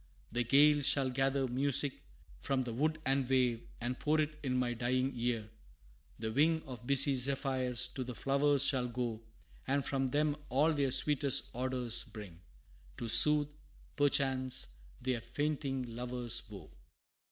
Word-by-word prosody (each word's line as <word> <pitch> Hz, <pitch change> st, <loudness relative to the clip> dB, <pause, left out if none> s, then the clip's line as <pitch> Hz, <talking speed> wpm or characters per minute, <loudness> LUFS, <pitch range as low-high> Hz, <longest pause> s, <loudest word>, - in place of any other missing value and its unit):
The 120 Hz, +2 st, 0 dB
gale 145 Hz, +4 st, +5 dB
Shall 135 Hz, -1 st, +1 dB
gather 135 Hz, +1 st, 0 dB
music 135 Hz, +2 st, 0 dB, 0.4 s
from 135 Hz, -1 st, -1 dB
the 120 Hz, -2 st, -5 dB
wood 155 Hz, +6 st, -1 dB
and 135 Hz, -1 st, 0 dB
wave, 125 Hz, -3 st, +1 dB, 0.2 s
And 125 Hz, +2 st, -4 dB
pour 155 Hz, +1 st, +1 dB
it 150 Hz, 0 st, -2 dB
in 130 Hz, -3 st, -1 dB
my 125 Hz, -1 st, 0 dB
dying 130 Hz, +3 st, -1 dB
ear; 120 Hz, -3 st, -2 dB, 0.7 s
the 110 Hz, 0 st, -4 dB
wing 160 Hz, +6 st, +2 dB
Of 125 Hz, -4 st, -10 dB
busy 140 Hz, 0 st, +5 dB
zephyrs 130 Hz, -1 st, -1 dB
to 130 Hz, -, -5 dB
the 125 Hz, -1 st, -7 dB
flowers 140 Hz, +1 st, +2 dB
shall 130 Hz, -3 st, +2 dB
go, 120 Hz, -2 st, -4 dB, 0.5 s
And 140 Hz, +1 st, 0 dB
from 135 Hz, -1 st, -1 dB
them 150 Hz, +2 st, 0 dB
all 150 Hz, +5 st, +2 dB
their 140 Hz, -2 st, 0 dB
sweetest 140 Hz, +1 st, +2 dB
odors 125 Hz, -2 st, -1 dB
bring, 95 Hz, -6 st, -11 dB, 0.6 s
To 120 Hz, -2 st, -5 dB
soothe, 150 Hz, +5 st, +6 dB, 0.4 s
perchance, 130 Hz, -, +1 dB, 0.3 s
their 125 Hz, -3 st, -2 dB
fainting 135 Hz, -4 st, -3 dB
lover's 120 Hz, -1 st, -3 dB
woe. 95 Hz, -7 st, -11 dB
130 Hz, 145 wpm, -33 LUFS, 120-140 Hz, 0.7 s, soothe